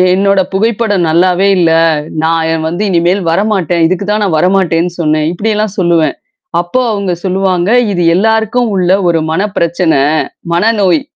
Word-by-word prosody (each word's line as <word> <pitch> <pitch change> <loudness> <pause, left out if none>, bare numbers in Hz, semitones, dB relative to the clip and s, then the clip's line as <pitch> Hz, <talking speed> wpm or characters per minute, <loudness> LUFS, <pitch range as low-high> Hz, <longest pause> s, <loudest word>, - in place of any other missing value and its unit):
"என்னோட 195 0 +2
புகைப்படம் 205 -2 0
நல்லாவே 180 +3 +2
இல்ல, 165 -2 +2 0.5
நான் 165 0 0
எ - - 0
வந்து 175 +5 -3
இனிமேல் 175 +2 +1
வரமாட்டேன், 180 -3 0
இதுக்கு 185 +3 -2
தான் 210 +1 0
நான் 165 -5 0
வரமாட்டேன்னு 180 -1 +1
சொன்னன்!" 155 -1 0
இப்டியெல்லாம் 210 +2 -2
சொல்லுவன். 170 -3 +1 0.4
அப்போ 175 +9 -1
அவுங்க 200 -3 -2
சொல்லுவாங்க. 190 -1 0 0.2
இது, 180 -3 -1
எல்லாருக்கும் 220 +5 +1
உள்ள 180 -1 +1 0.2
ஒரு 170 -1 +1
மன 165 +4 0 0.2
பிரச்சனை. 170 -3 +1 0.5
மனநோய்! 190 -3 +1
185 Hz, 140 wpm, -11 LUFS, 170-200 Hz, 0.5 s, என்னோட